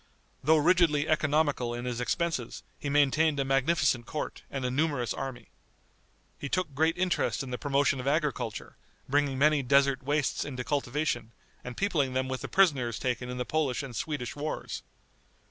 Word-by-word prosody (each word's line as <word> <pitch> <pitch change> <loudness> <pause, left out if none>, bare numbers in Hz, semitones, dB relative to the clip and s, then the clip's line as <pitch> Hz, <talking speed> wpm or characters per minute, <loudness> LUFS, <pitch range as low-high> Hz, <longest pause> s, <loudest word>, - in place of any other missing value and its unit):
Though 160 +1 +5
rigidly 155 -2 +3
economical 145 -5 +1
in 120 +1 -5
his 125 -1 -3
expenses, 150 -2 -2 0.2
he 145 - -3
maintained 145 +1 +3
a 135 - +1
magnificent 135 -3 +2
court 155 - -4
and 135 -2 -3
a 125 - 0
numerous 140 -3 0
army. 130 -2 -6 0.9
He 140 - -5
took 175 -4 -1
great 160 +4 +2
interest 180 -5 0
in 130 - -7
the 125 - -3
promotion 140 -1 +1
of 125 - -4
agriculture, 140 -6 -1 0.3
bringing 140 -1 +1
many 150 +1 +4
desert 140 +1 +3
wastes 145 +1 0
into 125 -3 -5
cultivation, 130 -3 -1 0.3
and 125 -1 -7
peopling 155 -10 +1
them 130 0 0
with 130 0 -3
the - - -4
prisoners 140 - +3
taken 125 -1 -2
in 125 - -4
the 125 - -2
Polish 145 -1 0
and 130 -3 -7
Swedish 145 -5 -3
wars. 150 +1 -4
140 Hz, 165 wpm, -29 LUFS, 125-155 Hz, 0.9 s, Though